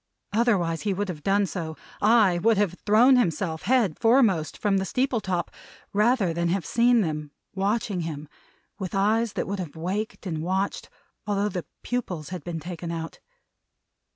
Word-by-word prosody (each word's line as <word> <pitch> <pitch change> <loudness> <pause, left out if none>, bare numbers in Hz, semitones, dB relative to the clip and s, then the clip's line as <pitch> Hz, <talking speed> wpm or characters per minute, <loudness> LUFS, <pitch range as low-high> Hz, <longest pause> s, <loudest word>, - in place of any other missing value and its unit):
Otherwise 195 -8 +2
he 200 -3 -1
would 205 +1 -2
have 155 -4 -5
done 200 +4 +2
so 165 -4 -5 0.2
ay, 210 -5 +4
would 225 +1 +4
have 200 -4 +1
thrown 240 +5 +6
himself, 170 -7 0
head 235 -11 +2
foremost, 220 - +3
from 200 -2 +1
the 190 - 0
steeple 250 +3 0
top, 180 -3 -2 0.4
rather 210 -3 +3
than 170 +1 0
have 180 -2 -1
seen 240 0 +4
them 150 -4 -3 0.2
watching 200 0 -1
him 155 -2 -5 0.5
with 190 -1 -4
eyes 215 +3 +2
that - - -2
would 200 +1 -3
have 170 -5 -6
waked 195 +7 -4
and 160 -4 -3
watched, 190 +4 -2 0.4
although 205 0 +1
the 180 -3 -4 0.2
pupils 185 -11 -3
had 180 -4 -6
been 170 -2 -4
taken 170 +1 -6
out. 165 -1 -5
195 Hz, 165 wpm, -25 LUFS, 170-215 Hz, 0.5 s, thrown